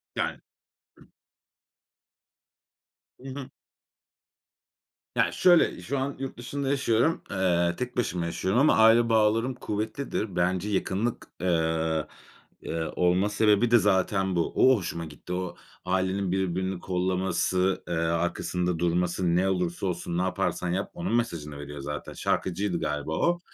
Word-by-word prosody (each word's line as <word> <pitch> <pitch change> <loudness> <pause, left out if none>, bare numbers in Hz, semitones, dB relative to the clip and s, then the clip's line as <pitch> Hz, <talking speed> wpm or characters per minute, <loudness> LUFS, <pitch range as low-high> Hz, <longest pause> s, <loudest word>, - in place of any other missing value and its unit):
Yani - - -2 0.6
Hı. - - -18 2.1
Hı 130 - -11
hı. 135 -1 -7 1.7
Yani - - +2
şöyle, 175 -2 +4
şu 140 - -2
an 135 +1 -2
yurt 135 -2 -5
dışında 135 +3 -3
yaşıyorum. 130 +2 +2
Eee, 85 -3 +1
tek 125 0 -4
başıma 90 -8 0
yaşıyorum 95 +7 0
ama 150 - +5
aile 115 +1 +6
bağlarım 115 +3 +3
kuvvetlidir. 110 -2 -3
Bence 90 +3 0
yakınlık, 105 +3 -1
eee, 80 -2 0 0.5
eee, 80 0 -3
olma 90 +3 +2
sebebi 105 +2 +3
de 120 - +8
zaten 95 -2 +1
bu. 85 - 0
O 130 -1 +6
hoşuma 85 -3 -4
gitti. 80 +3 -8
O 90 -1 -3 0.3
ailenin 95 +1 0
birbirini 95 0 -1
kollaması, 90 0 0
eee, 85 - -3
arkasında 85 +1 -1
durması 85 0 +1
ne 95 +2 +2
olursa 90 -1 -1
olsun 85 -1 -3
ne - - +1
yaparsan 90 -1 -1
yap 95 +3 -2
onun 175 -7 -2
mesajını 80 -11 -2
veriyor 75 0 -7
zaten. 75 +1 -6
Şarkıcıydı 95 0 -1
galiba 75 +1 -3
o. 175 0 +2
95 Hz, 130 wpm, -27 LUFS, 85-110 Hz, 2.1 s, de